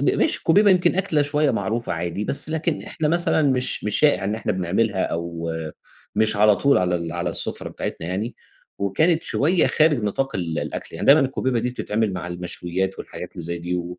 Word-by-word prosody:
م - - 0
ماشي، - - +1
الكُوبيبة 200 +5 +4
يمكن 180 -2 +3
أكلة 175 -6 +2
شوية 145 0 +1
معروفة 115 +2 -2
عادي، 85 +4 -3
بس 140 +6 -3
لكن 160 0 -1
إحنا 155 -2 -2
مثلًا 170 -1 +2
مش 130 -3 0
مش 105 -1 0
شائِع 145 -10 +3
إن 105 +2 0
إحنا 110 -1 -2
بنعملها 95 +2 0
أو 85 0 -3 0.6
مش 110 -1 +2
على 105 0 +5
طول 140 +4 +3
على 90 -1 +1
ال 85 -1 -4
على 85 0 -2
السُفرة - - -4
بتاعتنا 80 - -5
يعني 105 +6 -3 0.4
وكانت 160 - +2
شوية 165 +4 +2
خارج 155 -6 +3
نطاق 135 +7 -1
ال 85 -4 -2
الأكل. - - -5
يعني - - -3
دايمًا 145 +3 +8
الكُوبيبة 130 -2 0
دي 120 +2 -1
بتتعمل 110 -3 -1
مع 90 -2 -5
المشويّات 90 +2 -3
والحاجات - - -8
اللي 85 - -7
زي 85 +1 -3
دي 90 +1 -3
و 90 0 -4
105 Hz, 195 wpm, -23 LUFS, 90-145 Hz, 0.6 s, دايمًا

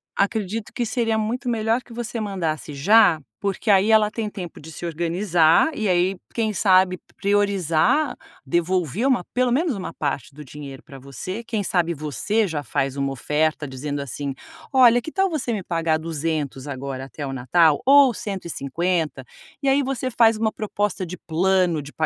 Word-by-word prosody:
acredito 210 +1 -1
que 240 - -1
seria 225 -2 0
muito 240 +4 -2
melhor 225 +1 +1
que 240 - -15
você 235 -1 -4
mandasse 165 -8 -3
já, 195 +1 +5 0.2
porque 200 +1 0
aí 195 +2 +4
ela 215 -1 +4
tem 215 -1 -3
tempo 180 -5 -8
de 160 +2 -11
se 170 - -7
organizar 170 - +2
e 215 - -1
aí, 180 +1 +2 0.2
quem 220 -2 0
sabe, 185 -2 +3 0.2
priorizar, 200 - +2 0.3
devolver 175 - 0
uma 245 -9 +2
pelo 250 -1 +2
menos 300 +2 +1
uma 185 -4 -6
parte 145 0 -3
do 150 +1 -10
dinheiro 140 0 -10
para 135 -1 -12
você, 160 - -6
quem 220 -3 -2
sabe 170 -2 +1
você 155 - -1
já 155 -3 -3
faz 135 +3 -2
uma 140 0 -1
oferta 150 +3 0
dizendo 140 +2 -4
assim: 140 +1 -4 0.4
"Olha, 245 -2 +6
que 315 - -7
tal 385 -1 +1
você 270 -7 -2
me 200 -4 -3
pagar 165 -2 0
200 155 -4 -3
agora 135 -1 -5
até 145 +1 -7
o 135 - -4
Natal, 150 +4 +3
ou 275 -2 +7
150." 170 -5 -2 0.4
E 275 - -2
aí 280 +1 +4
você 260 -1 -2
faz 225 -1 +4
uma 220 0 0
proposta 205 -3 -2
de 180 +2 -7
plano 175 -1 +1
de 145 +1 -10
185 Hz, 170 wpm, -23 LUFS, 155-220 Hz, 0.4 s, ou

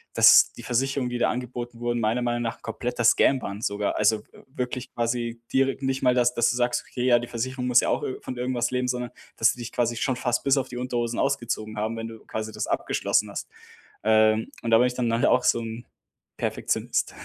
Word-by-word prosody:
dass - - +7
die - - -11
Versicherungen 130 +1 0
die 120 - -3
da - - +3
angeboten 120 -1 -6
wurden, 120 0 -1
meiner 115 +3 0
Meinung 120 0 -1
nach 115 +1 -4
kompletter 120 -1 -3
Scam 130 +3 +4
waren 100 +2 -6
sogar. 100 -1 -1
Also 105 0 +3
w - - -27 0.2
wirklich 125 -2 -5
quasi 120 0 -2
direkt 135 +1 +1
nicht 135 0 -1
mal, 125 -1 +4
dass 125 0 +3
dass 120 - +3
du 120 - -2
sagst: 120 0 0
„Okay, 125 -1 -3
ja, 120 -2 +5
die 120 - -6
Versicherung 125 +2 -3
muss 125 -1 +6
ja - - -1
auch - - 0
ir 130 - -4
von 130 - -6
irgendwas 125 -1 -1
leben.“, 125 0 0
sondern, 125 -1 -2 0.3
dass - - +4
sie 125 - -14
dich 120 0 -6
quasi 120 -1 0
schon 130 0 0
fast 120 -1 -1
bis 140 0 +3
auf 135 - 0
die 125 - -7
Unterhose 120 -2 -2
ausgezogen 110 -2 -2
haben, 110 +2 -2
wenn 115 0 -5
du 110 -1 -10
quasi 110 0 -5
das 110 0 -4
abgeschlossen - - 0
hast. - - -6 0.5
Ähm, 110 0 +3
und 115 - -2
da 115 - +7
bin 125 +2 +4
ich 125 - -3
dann 125 -2 0
nachher 115 +1 +2
auch 125 - +3
so 120 - +3
'n 115 +1 -7 0.5
Perfektionist, - - -1
120 Hz, 230 wpm, -25 LUFS, 115-125 Hz, 0.5 s, dass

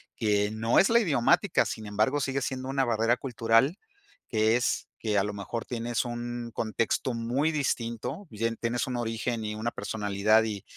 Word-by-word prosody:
que 105 -2 +1
no 110 +2 +2
es 195 - +5
la 235 +1 +6
idiomática, 145 - +3
sin 110 - -5
embargo, 110 +8 +1
sigue 135 0 -1
siendo 130 0 -3
una 135 0 +1
barrera 115 +1 +2
cultural, 120 - +2 0.5
que 110 0 +3
es 120 - 0
que 105 -2 0
a 100 - +3
lo 105 - -3
mejor 105 +3 -5
tienes 120 0 -2
un 120 0 -5
contexto 115 +3 -1
muy 120 +7 0
distinto, 130 - -2
y 110 +1 -3
en 115 0 0
tienes 120 +2 -1
un 125 - -3
origen 115 0 -2
y 105 0 -3
una 110 +2 -2
personalidad, 105 0 +1
y 105 -3 -4
115 Hz, 180 wpm, -28 LUFS, 110-125 Hz, 0.5 s, la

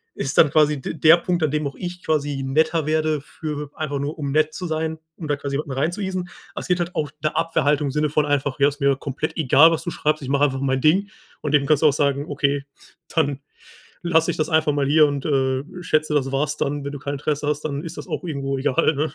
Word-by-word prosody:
ist 135 +1 -3
dann 155 - +7
quasi 150 -2 +3
d - - -5
der 160 +2 +7
Punkt, 175 -1 -1
an 150 - +1
dem 150 -1 -1
auch 140 - -7
ich 180 0 -6
quasi 145 -3 -1
netter 155 +3 +1
werde, 155 -1 0
für 150 -1 -6
einfach 145 -3 -3
nur 145 +3 -4
um 140 -2 -2
nett 155 0 +2
zu 180 - -5
sein, 160 0 -2 0.2
um 160 - -7
da 145 - +1
quasi 140 0 -5
jemanden 145 -1 -3
reinzueasen. 180 +6 -2 0.3
Es - - -5
geht 180 0 +1
halt 175 +1 -3
auch 150 -2 -1
'ne 155 - 0
Abwehrhaltung 150 -3 +1
im - - -2
Sinne 150 +1 0
von 150 0 +1
einfach: 140 -1 -1
„Ja, 140 - +5
ist 145 +1 -11
mir 140 -1 +3
komplett 140 +4 -4
egal, 155 +2 +6
was 165 - -1
du 175 - -3
schreibst. 155 -1 0
Ich 130 - -5
mache 140 +1 +2
einfach 135 -1 -2
mein 135 -1 0
Ding.“ 190 +6 +3 0.3
Und 150 - -3
dem 145 -2 +4
kannst 155 0 +3
du - - +7
auch 140 - +4
sagen: 140 -1 0
„Okay, 140 -1 0 0.5
dann 145 -4 +1 0.6
lasse 165 -2 +3
ich - - -6
das 155 - 0
einfach 155 -2 +2
mal 140 -1 0
hier 155 +1 +6
und, 140 -1 -3
äh, 130 -2 +1 0.2
schätze, 155 -2 0
das 135 -2 +1
war's 150 +2 -1
dann, 145 0 -2
wenn 140 - -4
du - - -5
kein 140 0 -4
Interesse 145 +1 -2
hast, 150 0 0
dann 145 0 -3
ist 165 - -7
das - - -7
auch - - -4
irgendwo 140 -4 -2
egal, 140 +3 +2
ne?“ 155 +2 -1
150 Hz, 250 wpm, -22 LUFS, 140-155 Hz, 0.6 s, dann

